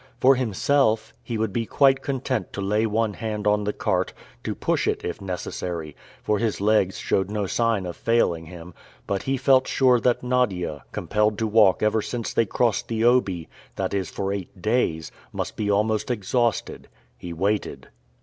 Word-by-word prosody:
For 135 Hz, +2 st, +6 dB
himself, 115 Hz, -1 st, +1 dB
he 115 Hz, -, -4 dB
would 110 Hz, -3 st, -1 dB
be 115 Hz, +1 st, -1 dB
quite 135 Hz, -1 st, +4 dB
content 130 Hz, -, -2 dB
to -, -, -5 dB
lay 105 Hz, +3 st, +1 dB
one 110 Hz, 0 st, 0 dB
hand 105 Hz, -1 st, -4 dB
on 105 Hz, 0 st, +2 dB
the 105 Hz, -, +1 dB
cart, -, -, -1 dB, 0.3 s
to -, -, -3 dB
push -, -, 0 dB
it -, -, -1 dB
if -, -, -4 dB
necessary, 90 Hz, -4 st, -5 dB, 0.3 s
for 105 Hz, -1 st, +1 dB
his 110 Hz, -1 st, -1 dB
legs 100 Hz, -2 st, +2 dB
showed 95 Hz, 0 st, 0 dB
no 105 Hz, -1 st, -1 dB
sign 115 Hz, -1 st, 0 dB
of 85 Hz, -2 st, -5 dB
failing 85 Hz, -8 st, +1 dB
him; 85 Hz, +1 st, -10 dB, 0.3 s
but 100 Hz, -1 st, -1 dB
he 135 Hz, 0 st, -1 dB
felt 130 Hz, 0 st, +4 dB
sure 125 Hz, -2 st, +4 dB
that 125 Hz, +1 st, +1 dB
Nadia, 95 Hz, -, 0 dB
compelled 105 Hz, 0 st, 0 dB
to 115 Hz, -, 0 dB
walk 105 Hz, -3 st, +4 dB
ever 110 Hz, +1 st, +2 dB
since 115 Hz, +1 st, -4 dB
they 115 Hz, -, +2 dB
crossed 115 Hz, +2 st, 0 dB
the 115 Hz, -1 st, -1 dB
Obi, 110 Hz, -9 st, +2 dB, 0.3 s
that -, -, -2 dB
is, 95 Hz, -2 st, -1 dB
for 100 Hz, 0 st, -2 dB
eight 95 Hz, -1 st, -6 dB
days, 100 Hz, -6 st, 0 dB, 0.2 s
must -, -, -4 dB
be 105 Hz, -1 st, -2 dB
almost 105 Hz, +3 st, +1 dB
exhausted. 120 Hz, +1 st, -1 dB, 0.3 s
He 90 Hz, -, -8 dB
waited. 100 Hz, +5 st, -2 dB
105 Hz, 180 wpm, -24 LUFS, 95-120 Hz, 0.3 s, For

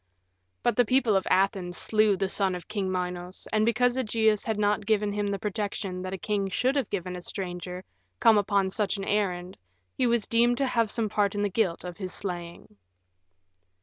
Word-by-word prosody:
But 240 Hz, -, +2 dB
the 245 Hz, -, +6 dB
people 245 Hz, -2 st, +2 dB
of 190 Hz, -, +1 dB
Athens 190 Hz, -2 st, +1 dB
slew 215 Hz, -2 st, +3 dB
the 195 Hz, -, 0 dB
son 190 Hz, -1 st, +1 dB
of 180 Hz, -, -8 dB
King 195 Hz, -3 st, -2 dB
Minos, 180 Hz, 0 st, -4 dB
and 215 Hz, 0 st, +3 dB
because 245 Hz, +2 st, +2 dB
Ægeus 220 Hz, -3 st, +2 dB
had 220 Hz, -2 st, -1 dB
not 210 Hz, 0 st, +1 dB
given 210 Hz, -2 st, +2 dB
him 205 Hz, 0 st, -1 dB
the 200 Hz, 0 st, -1 dB
protection 200 Hz, -2 st, -3 dB
that 185 Hz, 0 st, -5 dB
a 190 Hz, -, -3 dB
king 200 Hz, 0 st, -1 dB
should 255 Hz, +8 st, +1 dB
have 270 Hz, -8 st, 0 dB
given 180 Hz, -2 st, -3 dB
a 180 Hz, -, -6 dB
stranger 180 Hz, 0 st, -5 dB, 0.4 s
come 225 Hz, -3 st, +6 dB
upon 200 Hz, -1 st, +1 dB
such 210 Hz, 0 st, 0 dB
an 195 Hz, -, -4 dB
errand 185 Hz, -3 st, -1 dB, 0.4 s
he 255 Hz, -, +2 dB
was 235 Hz, -3 st, +1 dB
deemed 240 Hz, +1 st, +3 dB
to 275 Hz, -, +2 dB
have 230 Hz, -4 st, +1 dB
some 225 Hz, 0 st, 0 dB
part 205 Hz, -1 st, 0 dB
in 205 Hz, -, 0 dB
the 205 Hz, -, +1 dB
guilt 185 Hz, -4 st, 0 dB
of 180 Hz, -1 st, -7 dB
his 185 Hz, -3 st, -5 dB
slaying. 175 Hz, -, -6 dB
200 Hz, 200 wpm, -27 LUFS, 185-220 Hz, 0.4 s, the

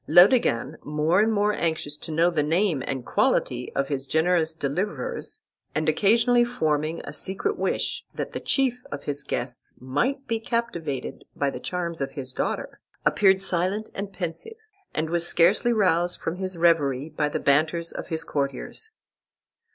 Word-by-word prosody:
Laodegan, 175 Hz, -, +5 dB
more 150 Hz, +4 st, +2 dB
and 220 Hz, +2 st, +4 dB
more 210 Hz, 0 st, +2 dB
anxious 160 Hz, -5 st, -1 dB
to 150 Hz, -, -10 dB
know 165 Hz, +3 st, +3 dB
the 160 Hz, -3 st, +1 dB
name 165 Hz, 0 st, +1 dB
and 130 Hz, -2 st, -3 dB
quality 125 Hz, -1 st, +1 dB
of 140 Hz, 0 st, +1 dB
his 135 Hz, -2 st, -3 dB
generous 160 Hz, 0 st, +2 dB
deliverers, 200 Hz, -, -3 dB, 0.3 s
and 155 Hz, 0 st, 0 dB
occasionally 230 Hz, +9 st, +4 dB
forming 155 Hz, -9 st, -1 dB
a 140 Hz, -, -7 dB
secret 190 Hz, -, -1 dB
wish -, -, -1 dB
that -, -, -4 dB
the -, -, -4 dB
chief 255 Hz, -2 st, +1 dB
of 145 Hz, -1 st, -5 dB
his 145 Hz, 0 st, -2 dB
guests 125 Hz, -2 st, -5 dB
might 250 Hz, -, -1 dB
be 230 Hz, -1 st, 0 dB
captivated 175 Hz, -, -3 dB
by 140 Hz, -1 st, 0 dB
the -, -, -6 dB
charms 170 Hz, -3 st, -3 dB
of 135 Hz, -, -2 dB
his 130 Hz, -2 st, -6 dB
daughter, -, -, -3 dB, 0.3 s
appeared 195 Hz, -2 st, +4 dB
silent 190 Hz, +3 st, -1 dB
and 200 Hz, 0 st, -5 dB
pensive, 195 Hz, -, -5 dB, 0.3 s
and 155 Hz, +1 st, -1 dB
was 170 Hz, 0 st, +2 dB
scarcely 195 Hz, +9 st, +4 dB
roused 180 Hz, -5 st, +2 dB
from 165 Hz, -, -3 dB
his 185 Hz, -1 st, -3 dB
reverie 150 Hz, -5 st, +3 dB
by 150 Hz, -1 st, -1 dB
the -, -, -2 dB
banters 160 Hz, +4 st, +2 dB
of -, -, -6 dB
his 160 Hz, -2 st, -2 dB
courtiers. 140 Hz, -, -3 dB
170 Hz, 160 wpm, -25 LUFS, 145-205 Hz, 0.3 s, Laodegan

